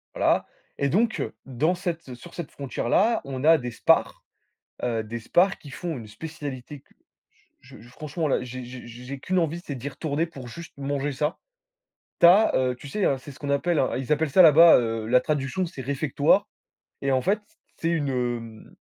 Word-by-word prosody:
Voilà. -, -, +2 dB, 0.3 s
Et 140 Hz, -, +1 dB
donc 220 Hz, -, +1 dB, 0.2 s
dans 145 Hz, +7 st, 0 dB
cette 165 Hz, -7 st, -5 dB
sur 170 Hz, +8 st, -13 dB
cette 170 Hz, -4 st, -6 dB
frontière 135 Hz, -4 st, -4 dB
là, 225 Hz, -, +3 dB
on 130 Hz, -1 st, -5 dB
a 165 Hz, +1 st, +7 dB
des 125 Hz, -4 st, -5 dB
SPAR. 115 Hz, -, +2 dB, 0.6 s
Heu, 115 Hz, -2 st, 0 dB
des 115 Hz, +2 st, -6 dB
SPAR 180 Hz, -, +2 dB
qui 145 Hz, -, -12 dB
font 165 Hz, +3 st, -5 dB
une 115 Hz, -3 st, -9 dB
spécialité 145 Hz, +2 st, -7 dB
cu -, -, -31 dB, 0.7 s
je -, -, -15 dB
je 120 Hz, -, -15 dB
franchement 155 Hz, +5 st, -4 dB
là, 135 Hz, -, +1 dB
j'ai 125 Hz, +1 st, -7 dB
j'ai 125 Hz, 0 st, -9 dB
j'ai 125 Hz, +4 st, -8 dB
qu'une 185 Hz, +6 st, 0 dB
envie, 165 Hz, 0 st, -1 dB
c'est 145 Hz, -, -5 dB
d'y 130 Hz, +3 st, -5 dB
retourner 155 Hz, +2 st, -2 dB
pour 135 Hz, -6 st, -10 dB
juste 170 Hz, +8 st, -10 dB
manger 140 Hz, +1 st, -2 dB
ça. 150 Hz, +4 st, -1 dB, 0.8 s
Tu -, -, +8 dB
as, 195 Hz, +6 st, +6 dB
heu, 130 Hz, -1 st, +1 dB
tu 140 Hz, -, -11 dB
sais, 200 Hz, +8 st, -1 dB
hein, 135 Hz, -, +1 dB
c'est 130 Hz, +3 st, -11 dB
ce 135 Hz, -, -16 dB
qu'on 145 Hz, -, -3 dB
appelle 155 Hz, +4 st, +1 dB
un 130 Hz, -, 0 dB
ils 130 Hz, +2 st, -2 dB
appellent 150 Hz, 0 st, +1 dB
ça 185 Hz, -, +7 dB
là-bas, 165 Hz, +1 st, +8 dB
heu, 115 Hz, -2 st, -2 dB
la 125 Hz, +3 st, +4 dB
traduction, 145 Hz, +6 st, -1 dB
c'est 160 Hz, -6 st, -8 dB
réfectoire. 135 Hz, +1 st, +1 dB, 0.5 s
Et 140 Hz, -, 0 dB
en 130 Hz, -1 st, +2 dB
fait, 200 Hz, +8 st, +1 dB
c -, -, -31 dB, 0.2 s
c'est 165 Hz, -, -1 dB
une, 155 Hz, -4 st, 0 dB, 0.6 s
hem, -, -, -21 dB
140 Hz, 205 wpm, -25 LUFS, 130-165 Hz, 0.8 s, Tu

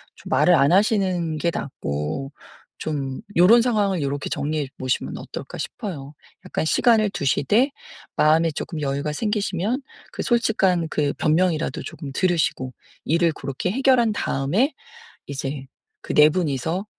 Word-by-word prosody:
좀 -, -, -12 dB
말을 180 Hz, -, +4 dB
안 145 Hz, 0 st, +4 dB
하시는 185 Hz, -6 st, +2 dB
게 170 Hz, +2 st, 0 dB
낫고 75 Hz, -, -4 dB, 0.5 s
좀 140 Hz, -4 st, -3 dB
'요런 205 Hz, +8 st, +7 dB
상황을 205 Hz, -7 st, +1 dB
요렇게 140 Hz, 0 st, -2 dB
정리해 150 Hz, 0 st, -2 dB
보시면 130 Hz, -1 st, -2 dB
어떨까?' -, -, -8 dB
싶어요. 150 Hz, -, -6 dB, 0.3 s
약간 -, -, -2 dB
시간을 215 Hz, +4 st, +3 dB
두시되 205 Hz, -, +2 dB, 0.4 s
마음에 160 Hz, +2 st, +4 dB
쪼끔 155 Hz, +1 st, -5 dB
여유가 140 Hz, +1 st, -1 dB
생기시면 210 Hz, -, -1 dB, 0.3 s
그 -, -, -5 dB
솔직한 195 Hz, -8 st, +2 dB
그 145 Hz, -2 st, 0 dB
변명이라도 165 Hz, 0 st, +1 dB
조금 140 Hz, -4 st, -7 dB
들으시고 160 Hz, -7 st, 0 dB, 0.3 s
일을 170 Hz, +1 st, +2 dB
고렇게 140 Hz, +7 st, -3 dB
해결한 255 Hz, -2 st, +3 dB
다음에 190 Hz, -, 0 dB, 0.5 s
이제 135 Hz, 0 st, -5 dB, 0.4 s
그 -, -, -5 dB
4 150 Hz, 0 st, +7 dB
분이서 165 Hz, -, -1 dB
165 Hz, 295 characters per minute, -23 LUFS, 140-200 Hz, 0.5 s, 요런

